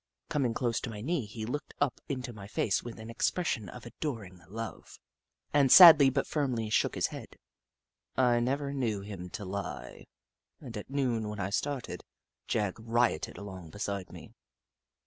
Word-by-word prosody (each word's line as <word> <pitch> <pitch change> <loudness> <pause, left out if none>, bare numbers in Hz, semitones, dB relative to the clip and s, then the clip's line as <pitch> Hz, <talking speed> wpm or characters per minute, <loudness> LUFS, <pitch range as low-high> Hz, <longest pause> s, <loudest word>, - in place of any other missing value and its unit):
Coming 130 -6 0
close 120 -3 0
to - - -5
my 105 -2 -7
knee 140 -2 -1
he 110 +1 -6
looked 145 +7 -5
up 145 -3 0
into 130 -3 -4
my 100 -2 -9
face 105 -1 0
with 120 -1 -8
an 110 +1 -8
expression 115 - -1
of 125 +3 -10
adoring 115 - -6
love, 115 +2 -7 0.6
and 140 -3 +4
sadly 160 -7 +11
but 135 +1 0
firmly 125 -8 -1
shook - - +2
his - - +1
head. - - -6 0.8
I 125 -2 +4
never 140 +3 -1
knew 115 -7 -1
him 95 -3 -7
to 100 - -6
lie, 100 +2 -6 0.5
and 125 -6 -9
at 105 - -7
noon, 125 -6 0
when 105 0 -6
I 95 0 -2
started, 140 +3 -2 0.4
Jagg 105 -2 -1
rioted 115 -5 0
along 95 -5 -8
beside 100 +1 -4
me. - - -12
115 Hz, 165 wpm, -30 LUFS, 105-135 Hz, 0.8 s, sadly